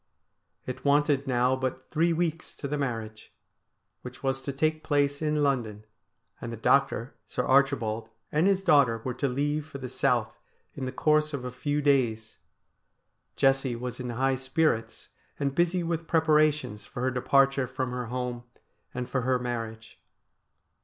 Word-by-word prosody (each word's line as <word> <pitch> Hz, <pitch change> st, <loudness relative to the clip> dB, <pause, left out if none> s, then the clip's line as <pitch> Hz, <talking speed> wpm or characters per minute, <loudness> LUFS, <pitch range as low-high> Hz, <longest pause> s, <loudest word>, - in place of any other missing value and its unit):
It 130 Hz, -, -6 dB
wanted 145 Hz, -1 st, +2 dB
now 125 Hz, 0 st, +2 dB
but 130 Hz, 0 st, -4 dB
three 165 Hz, +2 st, +2 dB
weeks 165 Hz, -1 st, -2 dB
to 140 Hz, -, -5 dB
the 145 Hz, -, -2 dB
marriage, 115 Hz, -6 st, -4 dB, 0.7 s
which 125 Hz, +1 st, -10 dB
was 135 Hz, 0 st, 0 dB
to 140 Hz, -, -4 dB
take 155 Hz, +3 st, 0 dB
place 145 Hz, 0 st, +1 dB
in 150 Hz, -1 st, +1 dB
London, 115 Hz, -7 st, -1 dB, 0.6 s
and 115 Hz, -, -5 dB
the 115 Hz, -, -6 dB
doctor, 135 Hz, +1 st, +2 dB
Sir 125 Hz, -, -2 dB
Archibald, 125 Hz, -5 st, +2 dB, 0.2 s
and 155 Hz, +5 st, +3 dB
his 195 Hz, -1 st, +2 dB
daughter 125 Hz, -9 st, +4 dB
were 130 Hz, -, -1 dB
to 140 Hz, +3 st, -1 dB
leave 145 Hz, +3 st, -1 dB
for 140 Hz, -, -8 dB
the 130 Hz, -2 st, -6 dB
South -, -, 0 dB, 0.3 s
in 135 Hz, -, -5 dB
the 130 Hz, -, -3 dB
course 150 Hz, +2 st, +2 dB
of 125 Hz, -3 st, -6 dB
a 125 Hz, -, -4 dB
few 145 Hz, +3 st, -2 dB
days. 115 Hz, -6 st, +1 dB, 1.0 s
Jessie 135 Hz, -2 st, +2 dB
was 125 Hz, +2 st, -5 dB
in 125 Hz, -1 st, -4 dB
high 130 Hz, +3 st, +1 dB
spirits, 130 Hz, -2 st, -1 dB, 0.3 s
and 140 Hz, -1 st, 0 dB
busy 175 Hz, +3 st, +1 dB
with 165 Hz, -1 st, -2 dB
pre 165 Hz, -, +3 dB
parations 150 Hz, -8 st, +2 dB
for 125 Hz, -, -6 dB
her 130 Hz, -, +1 dB
departure 135 Hz, +1 st, +3 dB
from 130 Hz, 0 st, -3 dB
her 125 Hz, -1 st, -4 dB
home 125 Hz, 0 st, -3 dB, 0.5 s
and 125 Hz, -1 st, -3 dB
for 130 Hz, +1 st, -1 dB
her 130 Hz, +1 st, +2 dB
mar 120 Hz, -2 st, -2 dB
riage. 110 Hz, 0 st, -14 dB
135 Hz, 165 wpm, -28 LUFS, 125-145 Hz, 1.0 s, daughter